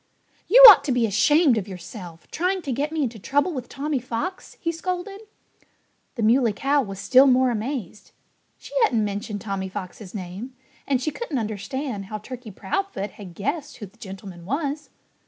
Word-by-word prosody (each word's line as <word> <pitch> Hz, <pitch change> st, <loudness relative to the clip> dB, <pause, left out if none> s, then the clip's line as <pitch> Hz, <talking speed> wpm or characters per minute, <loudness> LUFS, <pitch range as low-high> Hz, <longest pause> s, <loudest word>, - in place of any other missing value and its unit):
"You -, -, +9 dB
ought 380 Hz, -11 st, +10 dB
to 285 Hz, -, 0 dB
be 245 Hz, -2 st, +2 dB
ashamed 245 Hz, -, +4 dB
of 200 Hz, -, -7 dB
yourself 180 Hz, -2 st, -10 dB
trying 365 Hz, +2 st, -1 dB
to 275 Hz, -, -3 dB
get 285 Hz, +5 st, -1 dB
me 320 Hz, -2 st, 0 dB
into 230 Hz, -4 st, -4 dB
trouble 285 Hz, -, 0 dB
with 255 Hz, -4 st, -6 dB
Tommy 290 Hz, 0 st, -2 dB
Fox!" 255 Hz, +10 st, -5 dB
he 335 Hz, -, -1 dB
scolded. 365 Hz, +4 st, -4 dB, 0.9 s
The 235 Hz, -, -2 dB
Muley 230 Hz, 0 st, +4 dB
Cow 280 Hz, +7 st, +1 dB
was 195 Hz, -6 st, -6 dB
still 260 Hz, +7 st, +5 dB
more 255 Hz, -1 st, +4 dB
amazed. 225 Hz, -3 st, -5 dB, 0.5 s
She -, -, -13 dB
hadn't 235 Hz, -, +3 dB
mentioned 205 Hz, 0 st, -4 dB
Tommy 195 Hz, -2 st, -4 dB
Fox's 185 Hz, 0 st, -8 dB
name; 200 Hz, +7 st, -7 dB, 0.3 s
and 270 Hz, -2 st, +2 dB
she 310 Hz, -, -1 dB
couldn't 325 Hz, -, -4 dB
understand 220 Hz, +1 st, -4 dB
how 215 Hz, +2 st, -5 dB
Turkey 245 Hz, +2 st, -9 dB
Proudfoot 205 Hz, -, -3 dB
had 185 Hz, -5 st, -11 dB
guessed 290 Hz, +7 st, -3 dB
who 215 Hz, -, -7 dB
the 200 Hz, +4 st, -18 dB
gentleman 190 Hz, -4 st, -9 dB
was. 285 Hz, -, -3 dB
245 Hz, 175 wpm, -24 LUFS, 205-290 Hz, 0.9 s, ought